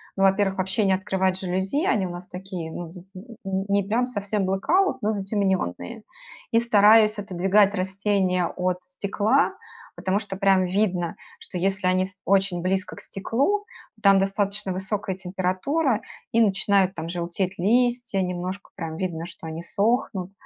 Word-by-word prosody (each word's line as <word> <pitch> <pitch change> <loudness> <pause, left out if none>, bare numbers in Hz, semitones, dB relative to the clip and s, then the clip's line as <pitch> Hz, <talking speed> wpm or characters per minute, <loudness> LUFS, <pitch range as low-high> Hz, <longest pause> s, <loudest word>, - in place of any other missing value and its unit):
ну, 195 - +1
во-первых, 195 0 +2
вообще 190 +3 +1
не 190 - +4
открывать 190 0 0
жалюзи- 190 - -1
они 195 -3 +2
у 175 - -4
нас 175 +1 -8
такие, 180 -3 -6
ну, 170 -1 -6
з 180 - -5
з 220 +5 -11
не 195 0 -1
не 200 0 +2
прям 240 +4 +2
совсем 205 -4 -2
blackout, 335 - +2
но 215 0 +1
затемненные. 200 - -1 0.5
И 230 - +5
стараюсь 215 -1 +5
отодвигать 195 +1 +2
растения 190 -1 0
от 180 0 -2
стекла, 210 - +1 0.4
потому 190 +2 0
что 200 -3 -7
прям 195 -2 +4
видно, 180 -3 0 0.2
что 180 - -7
если 190 0 0
они 185 0 +3
ст 190 0 -12
очень 195 -2 +2
близко 185 0 -1
к - - -10
стеклу, 280 - -1 0.3
то 215 - -25
там 195 -1 +6
достаточно 200 0 -1
высокая 190 +1 -2
температура, 190 - 0 0.3
и 230 - +3
начинают 195 -2 +3
там 165 0 -5
желтеть 175 +2 -2
листья, 240 +1 +2
немножко 180 +2 -4
прям 165 -3 -5
видно, 170 -3 -3
что 170 -2 -10
они 160 +1 -6
сохнут. 200 -1 0
195 Hz, 160 wpm, -24 LUFS, 185-210 Hz, 0.5 s, там